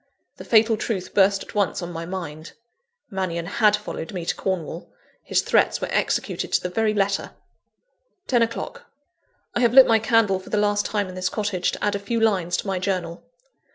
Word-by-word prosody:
The - - -10
fatal 225 0 +4
truth 190 -4 -3
burst 195 0 +3
at - - -13
once 205 -2 0
on 175 - -5
my 165 0 -6
mind. 165 -4 -6 0.6
Mannion 180 -3 -2
had 210 +3 +3
followed 210 -5 -6
me 175 -2 -4
to - - 0
Cornwall: 185 -5 -4 0.3
his - - 0
threats - - +2
were - - -3
executed - - -1
to - - +3
the 180 - -2
very 220 +4 +1
letter! 200 -1 -1 0.9
(10 245 -2 +2
o'clock.) 230 0 -3 0.7
I - - 0
have 240 0 +2
lit 265 -1 +10
my 225 -1 +4
candle 220 -3 +2
for 185 - -13
the 210 - 0
last 205 0 +1
time 205 -2 -1
in 185 - -8
this 185 0 -2
cottage, 205 -4 -1
to - - -6
add 205 - +1
a 200 - -2
few 230 +4 -2
lines 185 -6 +1
to - - -4
my 190 -2 -1
journal. 180 -3 -3
195 Hz, 195 wpm, -23 LUFS, 180-215 Hz, 0.9 s, lit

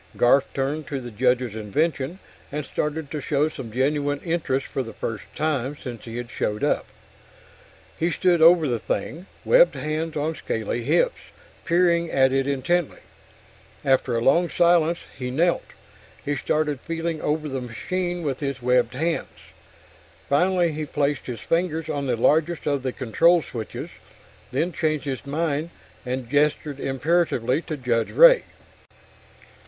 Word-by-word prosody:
Garf 135 +3 +5
turned 145 +3 -2
to 140 - -3
the 120 -2 -8
Judge's 125 0 +1
invention 140 - -1 0.3
and 150 0 -3
started 150 -1 -3
to 150 - -3
show 150 +2 +1
some 125 -7 -8
genuine 145 +3 0
interest 160 -6 -1
for 135 - -3
the 115 -3 -7
first 105 -6 -4
time 145 -2 -1
since 120 -4 -8
he 115 0 -6
had 120 0 -6
showed 105 -3 -2
up. - - +1 1.1
He 165 - +2
stood 175 0 +2
over 165 -1 +7
the 120 -3 -1
thing, 165 - -4 0.2
webbed - - +5
hands 155 +1 -3
on 155 +2 -1
scaly 115 -5 -3
hips, - - +2 0.5
peering 170 -1 +3
at 130 -2 +3
it 135 0 +1
intently. 140 +5 0 0.8
After 130 -2 +2
a 115 - -1
long 170 +7 +4
silence, 170 -1 +3 0.2
he 125 -2 -4
knelt, 170 +7 +1 0.6
and 145 - 0
started 150 -3 0
feeling 165 0 -3
over 155 +1 -1
the 135 -2 -3
machine 175 - -3
with 135 -4 -2
his 140 -2 -3
webbed 125 -1 +2
hands. 165 +4 -2 0.9
Finally 175 +3 +2
he 155 0 -4
placed 145 -2 -1
his 120 -4 -5
fingers 165 -2 -1
on 140 -1 -2
the 125 - +1
largest 160 +7 +2
of 145 -2 0
the 130 0 -2
control 165 +8 +3
switches 115 -3 -6 0.6
then 165 +7 0
changed 155 -2 -1
his 140 0 -4
mind 155 +1 -1 0.4
and 125 -1 -3
gestured 145 +1 +1
imperatively 135 -2 +1
to 155 -3 -5
Judge 120 -3 0
Ray. - - +7
145 Hz, 150 wpm, -24 LUFS, 130-165 Hz, 1.1 s, over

